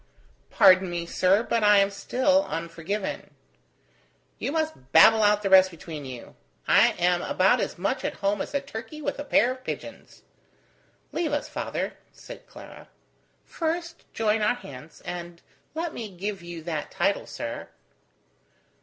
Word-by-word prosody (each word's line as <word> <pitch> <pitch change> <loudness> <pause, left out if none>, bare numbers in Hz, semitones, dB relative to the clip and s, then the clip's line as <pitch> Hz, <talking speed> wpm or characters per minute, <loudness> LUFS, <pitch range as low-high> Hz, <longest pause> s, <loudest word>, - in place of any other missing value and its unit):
"Pardon 185 0 +5
me, 175 -1 -3
sir, 185 +5 +2
but 230 -2 0
I 210 0 +6
am 200 0 +3
still 260 +8 +1
unforgiven." 170 +5 -5 1.0
"You 265 - -2
must 315 - -3
babble 220 +9 +7
out 210 0 +3
the 195 - 0
rest 190 0 +8
between 160 -4 -9
you. 125 -3 -9 0.3
I - - +5
am 175 0 +1
about 185 +1 +2
as - - -3
much 200 +9 -2
at - - -2
home 200 0 -1
as - - -5
a 280 - +1
turkey 275 +2 -8
with 285 -1 -4
a - - -3
pair 280 -3 +3
of 255 0 -8
pigeons." - - -8 0.9
"Leave 320 -4 -2
us, 290 - -1
father," - - -4
said - - -12
Clara. - - -13 0.6
"First 340 +1 -4
join 220 -1 0
our 210 - +2
hands, 150 - -12
and 175 -1 -7 0.4
let 330 0 -3
me 225 -3 -6
give 195 +1 -5
you 170 -1 -8
that 155 -3 -4
title, - - 0
sir." - - -6
200 Hz, 155 wpm, -26 LUFS, 175-260 Hz, 1.0 s, rest